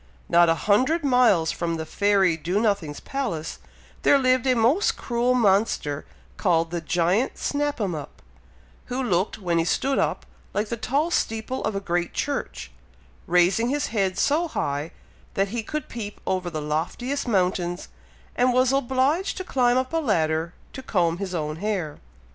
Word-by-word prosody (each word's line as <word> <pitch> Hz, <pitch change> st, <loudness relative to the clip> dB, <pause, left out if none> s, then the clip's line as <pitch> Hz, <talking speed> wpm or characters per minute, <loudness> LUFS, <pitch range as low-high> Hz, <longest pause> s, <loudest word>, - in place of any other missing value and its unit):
Not 170 Hz, 0 st, +5 dB
a 165 Hz, -, +4 dB
hundred 260 Hz, +10 st, +3 dB
miles 245 Hz, -, +4 dB
from 170 Hz, -1 st, -2 dB
the 160 Hz, -, -4 dB
fairy 195 Hz, -2 st, +2 dB
Do 175 Hz, +5 st, -1 dB
nothing's 200 Hz, -9 st, 0 dB
palace, 230 Hz, -, -4 dB, 0.4 s
there 285 Hz, -, +5 dB
lived 255 Hz, -1 st, +2 dB
a 255 Hz, -, +4 dB
most 250 Hz, -, +2 dB
cruel 245 Hz, +1 st, 0 dB
monster 195 Hz, -, +1 dB, 0.3 s
called 165 Hz, -3 st, +1 dB
the 170 Hz, -1 st, -2 dB
giant 175 Hz, +9 st, +1 dB
Snap 290 Hz, -1 st, -1 dB
'em 195 Hz, -5 st, -1 dB
up, 150 Hz, -3 st, -7 dB, 0.7 s
who 255 Hz, +1 st, -3 dB
looked, 185 Hz, -4 st, 0 dB
when 175 Hz, -5 st, 0 dB
he -, -, +2 dB
stood 270 Hz, +11 st, 0 dB
up, -, -, -1 dB, 0.3 s
like 210 Hz, +1 st, -1 dB
the 235 Hz, -, -1 dB
tall 280 Hz, +8 st, 0 dB
steeple 225 Hz, -2 st, -1 dB
of 215 Hz, -, -1 dB
a -, -, 0 dB
great 175 Hz, -2 st, -2 dB
church, 285 Hz, -1 st, -3 dB, 0.6 s
raising 180 Hz, +7 st, +3 dB
his 290 Hz, +1 st, -1 dB
head 190 Hz, -3 st, 0 dB
so 315 Hz, -, +2 dB
high, 145 Hz, -, -2 dB, 0.5 s
that 195 Hz, 0 st, +1 dB
he 235 Hz, +2 st, -2 dB
could 305 Hz, +7 st, -5 dB
peep 210 Hz, -3 st, -7 dB
over 185 Hz, -2 st, -1 dB
the 155 Hz, -3 st, -4 dB
loftiest 180 Hz, -, -2 dB
mountains, 180 Hz, -4 st, 0 dB, 0.5 s
and 250 Hz, 0 st, +3 dB
was 255 Hz, +1 st, +3 dB
obliged 275 Hz, +8 st, +1 dB
to 375 Hz, -, -3 dB
climb 250 Hz, -7 st, +2 dB
up 260 Hz, +3 st, -1 dB
a -, -, +2 dB
ladder 165 Hz, -, 0 dB, 0.2 s
to 265 Hz, -, -7 dB
comb 175 Hz, -8 st, 0 dB
his 190 Hz, -2 st, -4 dB
own 155 Hz, -1 st, -3 dB
hair. 190 Hz, -6 st, -3 dB
205 Hz, 165 wpm, -24 LUFS, 175-255 Hz, 0.7 s, Not